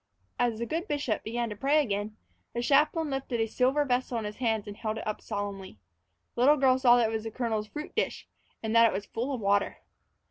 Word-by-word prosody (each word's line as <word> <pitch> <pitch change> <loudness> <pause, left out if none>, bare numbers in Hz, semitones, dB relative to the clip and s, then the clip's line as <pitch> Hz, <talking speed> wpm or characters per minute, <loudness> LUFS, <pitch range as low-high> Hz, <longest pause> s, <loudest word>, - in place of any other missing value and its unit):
As 240 -2 +1
the 235 - -2
good 330 - -3
bishop 285 - -1
began 235 +2 -2
to - - -4
pray 275 +8 +3
again, 210 -5 -2 0.4
the 235 - -1
chaplain 300 +3 +3
lifted 270 -3 -2
a 225 - +2
silver 260 +6 +1
vessel 250 -2 0
in 220 - -3
his 210 0 -6
hands 220 -4 0
and 205 - -7
held 215 0 -3
it - - -6
up 215 - -3
solemnly. 200 - -5 0.6
The - - -3
little 290 +4 +6
girl 260 -1 +4
saw 245 -2 +6
that 230 -2 +3
it - - -4
was 220 -1 -2
the - - -2
colonel's 220 -2 -2
fruit 300 +6 -7
dish, - - -2 0.4
and 220 +1 -1
that 230 0 +8
it - - -1
was 200 +2 -3
full 245 +5 -3
of 260 - -2
water. 200 0 +1
235 Hz, 235 wpm, -29 LUFS, 215-265 Hz, 0.6 s, that